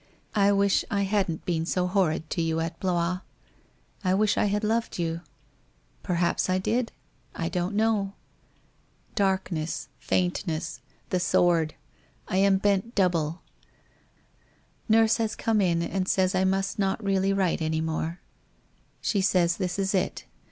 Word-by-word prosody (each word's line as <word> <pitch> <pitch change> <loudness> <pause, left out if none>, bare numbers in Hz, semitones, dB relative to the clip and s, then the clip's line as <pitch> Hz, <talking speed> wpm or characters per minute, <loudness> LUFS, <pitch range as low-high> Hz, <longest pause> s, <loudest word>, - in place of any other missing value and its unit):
I 205 -1 +4
wish 200 -1 +3
I 200 0 +1
hadn't 195 -5 -1
been 165 -2 0
so 180 0 +1
horrid 180 -4 +1
to - - 0
you 165 0 0
at 165 0 -3
Blois. 180 -1 0 0.8
I 185 0 +2
wish 210 +1 +2
I - - +2
had 205 +1 0
loved 225 +2 0
you? 165 -1 -2 0.8
Perhaps 175 +1 0
I 185 - +2
did? 230 +5 0 0.4
I 165 -1 -2
don't 180 +3 -2
know. 210 -2 +1 1.0
Darkness 190 -5 -1
— - - -37
f - - -19
aintness 170 -3 0
— - - -36
the 185 - +2
sword 170 -3 +2 0.3
— - - -35
I 185 - -1
am 195 0 +4
bent 200 +4 0
double. 170 -4 +1 1.5
Nurse 225 0 +5
has 225 -2 -1
come 220 -2 +1
in 170 -3 +2
and 185 +1 -2
says 190 0 +2
I 185 0 +2
must 195 +2 0
not 195 +2 0
really 195 -1 +2
write 190 -4 +1
any 160 0 0
more 160 +1 -3 0.8
She 200 - +1
says 180 -3 +2
this 180 -2 -2
is 195 0 0
it. 190 - -1
185 Hz, 155 wpm, -27 LUFS, 170-200 Hz, 1.5 s, Nurse